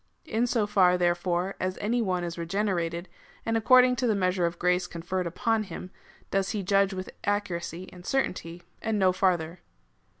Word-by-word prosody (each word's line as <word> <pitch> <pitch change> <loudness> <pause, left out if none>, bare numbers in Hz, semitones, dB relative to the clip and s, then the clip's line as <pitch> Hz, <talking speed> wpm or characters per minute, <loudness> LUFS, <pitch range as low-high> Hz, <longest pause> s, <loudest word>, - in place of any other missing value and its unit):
In 230 +3 0
so 230 -3 +1
far, 185 -3 +4
therefore, 175 +1 0
as 185 0 -2
any 235 +4 0
one 185 -4 0
is 170 -1 -4
regene 195 +5 -1
rated, 170 +1 -3 0.4
and 225 - 0
according 250 +3 +6
to 250 - +1
the 220 - +2
measure 185 -2 +1
of 170 0 -5
grace 180 +1 +1
conferred 175 +2 -3
upon 225 +6 0
him, 180 0 -8 0.4
does 195 0 +1
he 210 -3 -2
judge 195 +1 +3
with 185 -1 -5
accuracy 185 -3 -2
and 180 -1 -12
certainty, 175 -8 -2 0.2
and 220 -1 -1
no 190 -2 +4
farther. 180 -2 0
185 Hz, 175 wpm, -27 LUFS, 175-210 Hz, 0.4 s, according